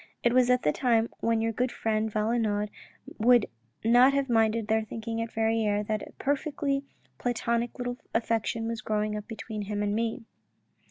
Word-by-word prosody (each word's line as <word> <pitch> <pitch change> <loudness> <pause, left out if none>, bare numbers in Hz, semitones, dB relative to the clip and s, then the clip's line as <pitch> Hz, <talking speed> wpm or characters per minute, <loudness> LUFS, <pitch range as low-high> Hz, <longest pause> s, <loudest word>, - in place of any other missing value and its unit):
It 240 - +3
was 250 -1 +4
at 250 0 +3
the 150 - +3
time 230 - +2
when 230 -1 +1
your 225 0 +1
good 245 +3 -1
friend 220 0 -1
Valenod 210 -1 0 0.5
would 240 0 +5 0.4
not 245 +4 +6
have 275 -2 0
minded 225 -1 +2
their 220 0 +2
thinking 225 +1 -4
at 230 - -4
Verrieres 220 -2 +1
that 215 0 -1
a - - -13
perfectly 280 0 -1 0.4
platonic 235 -1 -1
little 245 -1 -3
affection 225 0 0
was 230 -1 -3
growing 210 0 -1
up 210 -1 -6
between 220 -1 -6
him 205 0 -2
and 205 0 0
me." 225 +1 -1
225 Hz, 170 wpm, -28 LUFS, 215-240 Hz, 0.5 s, not